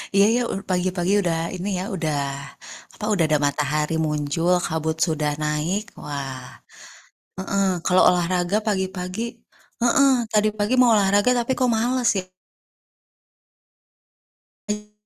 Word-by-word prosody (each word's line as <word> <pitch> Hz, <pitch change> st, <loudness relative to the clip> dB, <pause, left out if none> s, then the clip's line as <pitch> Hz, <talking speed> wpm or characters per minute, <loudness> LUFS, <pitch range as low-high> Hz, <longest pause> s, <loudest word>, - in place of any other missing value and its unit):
Iya 200 Hz, -, +6 dB
iya, 245 Hz, -, +2 dB
u -, -, -3 dB
pagi-pagi 180 Hz, +1 st, 0 dB
udah 170 Hz, -3 st, 0 dB, 0.2 s
ini 185 Hz, +3 st, -4 dB
ya, -, -, -3 dB
udah 155 Hz, -4 st, -1 dB, 0.8 s
apa, 210 Hz, -, -6 dB
udah 170 Hz, -5 st, +2 dB
ada 155 Hz, -1 st, +3 dB
matahari 150 Hz, +2 st, 0 dB
muncul, 150 Hz, +4 st, 0 dB
kabut 160 Hz, -1 st, -2 dB
sudah 150 Hz, -2 st, -1 dB
naik. 150 Hz, +7 st, -1 dB, 0.2 s
Wah, 135 Hz, -3 st, -6 dB, 0.9 s
heeh, 195 Hz, +1 st, 0 dB, 0.2 s
kalau 185 Hz, 0 st, +4 dB
olahraga 180 Hz, +2 st, +1 dB
pagi-pagi 190 Hz, 0 st, -2 dB, 0.6 s
heeh, 270 Hz, +3 st, +4 dB, 0.2 s
tadi 215 Hz, 0 st, +3 dB
pagi 210 Hz, +5 st, +1 dB
mau 245 Hz, -2 st, +6 dB
olahraga 205 Hz, +3 st, +3 dB
tapi 240 Hz, +2 st, 0 dB
kok 255 Hz, -1 st, +2 dB
males, 245 Hz, +2 st, +1 dB, 2.4 s
ya. 210 Hz, 0 st, -7 dB
180 Hz, 120 wpm, -23 LUFS, 155-210 Hz, 2.4 s, Iya